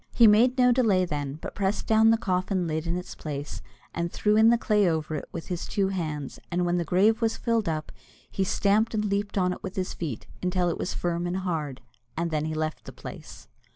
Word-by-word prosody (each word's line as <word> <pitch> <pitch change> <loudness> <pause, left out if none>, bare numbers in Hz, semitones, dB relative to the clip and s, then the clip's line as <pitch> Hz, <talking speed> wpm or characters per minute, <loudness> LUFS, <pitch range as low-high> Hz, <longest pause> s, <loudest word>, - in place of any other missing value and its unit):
He 235 - +7
made 230 +5 +5
no 250 -1 +5
delay 215 -7 +3
then, 145 -3 -4
but - - -5
pressed 195 +1 -1
down 220 0 +5
the 225 - +5
coffin 185 -2 0
lid 160 0 -2
in 170 +1 0
its 180 - -6
place, 145 -1 -6 0.3
and 170 0 -2
threw 210 0 +1
in 220 +1 +6
the 235 - +5
clay 210 -4 +2
over 160 -1 -2
it 150 - -5
with 165 - -7
his 175 -1 -3
two 195 -2 0
hands; 155 -7 -4
and 175 +1 0
when 175 0 +1
the 175 - 0
grave 210 +7 +3
was 225 -1 +1
filled 230 -5 0
up, 155 -1 -3 0.4
he 195 - 0
stamped 210 +4 +2
and 210 0 0
leaped 200 0 -1
on 180 -1 +2
it - - -10
with 190 - -6
his 185 -1 -2
feet, 150 -10 -5 0.2
until 180 -1 +1
it 170 - -3
was - - -3
firm 175 0 -1
and 175 +1 -2
hard, 160 -8 -3 0.4
and 170 0 -1
then 155 -1 0
he 155 0 -3
left 155 0 -3
the - - -8
place. - - -10
180 Hz, 230 wpm, -27 LUFS, 165-210 Hz, 0.4 s, He